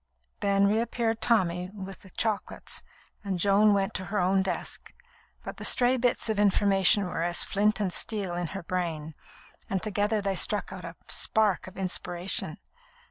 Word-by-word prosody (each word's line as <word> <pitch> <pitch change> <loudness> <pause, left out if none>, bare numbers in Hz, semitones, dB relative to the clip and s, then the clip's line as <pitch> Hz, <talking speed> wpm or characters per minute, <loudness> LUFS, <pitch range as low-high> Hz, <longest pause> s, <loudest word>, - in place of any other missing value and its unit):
Then 200 0 +3
reappeared 225 +2 0
Tommy 180 -6 +1
with 195 -1 -8
the 190 - -15
chocolates, 215 +1 -3 0.4
and 195 -3 -2
Joan 200 +3 +4
went 195 +2 0
to 185 - -3
her 205 +3 -3
own 190 +1 +3
desk; 190 -2 -4 0.5
but - - -7
the - - -7
stray 250 +1 +4
bits 245 -2 +1
of 220 -2 0
information 200 -1 +4
were 175 -2 -3
as 175 +1 +2
flint 210 +1 +1
and 190 -4 -1
steel 200 -5 -1
in 175 0 -2
her 195 - -7
brain, 165 -3 -3 0.6
and 190 -2 -1
together 210 0 0
they 200 -1 -1
struck 200 +1 0
out 180 -2 -8
a 170 +1 -8
spark 215 -5 +1
of 185 - -11
inspiration. 180 -1 -2
195 Hz, 165 wpm, -28 LUFS, 180-210 Hz, 0.6 s, Joan